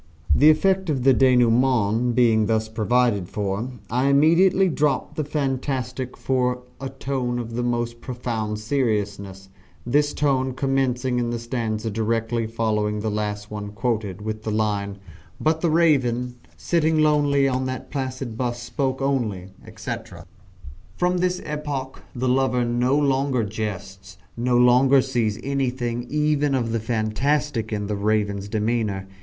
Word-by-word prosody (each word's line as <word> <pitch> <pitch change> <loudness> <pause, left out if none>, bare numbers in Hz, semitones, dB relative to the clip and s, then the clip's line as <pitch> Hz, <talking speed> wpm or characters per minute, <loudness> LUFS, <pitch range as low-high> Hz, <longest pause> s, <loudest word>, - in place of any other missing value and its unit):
The 150 - +6
effect 190 +3 +2
of 135 -5 0
the 135 0 +6
denouement 120 -2 +3
being 110 -4 +4
thus 110 0 +1
provided 110 -3 +1
for, 105 +3 -2 0.2
I 125 +3 +1
immediately 170 +7 +4
drop 150 -4 0
the 155 - -2
fantastic 130 -3 -3
for 125 -1 0 0.2
a 135 0 -4
tone 130 -2 -3
of 115 -1 -5
the 120 - -1
most 120 -1 -2
profound 115 -4 -3
seriousness 105 -5 -2 0.4
this 145 +4 +1
tone 130 -3 +1
commencing 130 -2 0
in 120 -1 -1
the 120 - -2
stanza 115 -2 -3
directly 115 +1 -1
following 105 -2 -1
the 110 - -1
one 105 - -3
last 105 0 -3 0.3
quoted, 105 -5 -2
with 110 0 -4
the 110 - -4
line, 105 -2 -1 0.4
But 160 +1 +1
the 170 - +2
Raven, 130 -7 +2 0.2
sitting 160 -2 +1
lonely 145 -2 +3
on 130 0 -1
that 130 0 -5
placid 130 -4 -4
bust, 120 0 -3
spoke 135 +1 -2
only, 110 -9 -1 0.2
etc. - - -7 0.7
From 180 0 +1
this 180 0 0
epoch 145 -3 -4
the 130 +1 -1
lover 125 -1 +2
no 120 +3 +1
longer 135 -3 +1
jests 100 -3 -6 0.2
no 120 +1 +1
longer 125 +3 +5
sees 115 -5 -1
anything 125 -3 -2
even 150 -1 +1
of 115 -3 -1
the 115 - 0
fantastic 115 +3 -1
in 105 -1 -2
the 105 +1 -2
Raven's 100 -1 0
demeanour. 105 -2 -1
125 Hz, 140 wpm, -23 LUFS, 110-135 Hz, 0.7 s, The